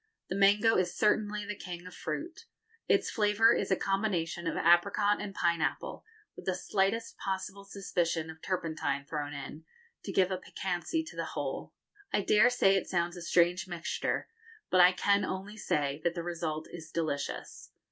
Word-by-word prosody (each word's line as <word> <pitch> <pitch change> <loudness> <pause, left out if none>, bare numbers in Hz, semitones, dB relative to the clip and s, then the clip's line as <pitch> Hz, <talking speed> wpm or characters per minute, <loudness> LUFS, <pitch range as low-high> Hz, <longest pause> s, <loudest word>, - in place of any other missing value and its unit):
The 185 - -2
mango 205 +3 +5
is 180 -1 0
certainly 210 -1 +1
the 210 - -4
king 175 -2 -7
of 180 - -10
fruit. 350 +9 -5 0.4
Its - - +2
flavour 220 +1 +4
is 200 - -1
a 190 - +4
combination 180 -4 -1
of - - -1
apricot 200 +5 +4
and 210 -1 -4
pineapple, 170 -4 -1 0.3
with - - -11
the 185 - +1
slightest 195 +4 0
possible 195 +1 -4
suspicion 170 -5 -1
of 160 0 -15
turpentine 160 -6 -2
thrown 145 0 -4
in, 145 +2 -7 0.4
to - - -4
give 190 0 +3
a 185 - 0
piquancy 185 - -2
to 320 - -11
the - - -2
whole. - - -4 0.4
I - - +2
dare 215 +5 +5
say 195 -6 +4
it 195 - 0
sounds 175 0 0
a 175 - -8
strange 175 +2 +2
mixture, 175 -2 -2 0.4
but 185 - +6
I 180 +1 +8
can 200 +2 +2
only 190 +3 -4
say 145 -7 -1
that 170 0 +1
the 170 - -3
result 165 -2 -3
is 165 -2 -9
delicious. 155 -3 -3
185 Hz, 170 wpm, -31 LUFS, 170-205 Hz, 0.4 s, I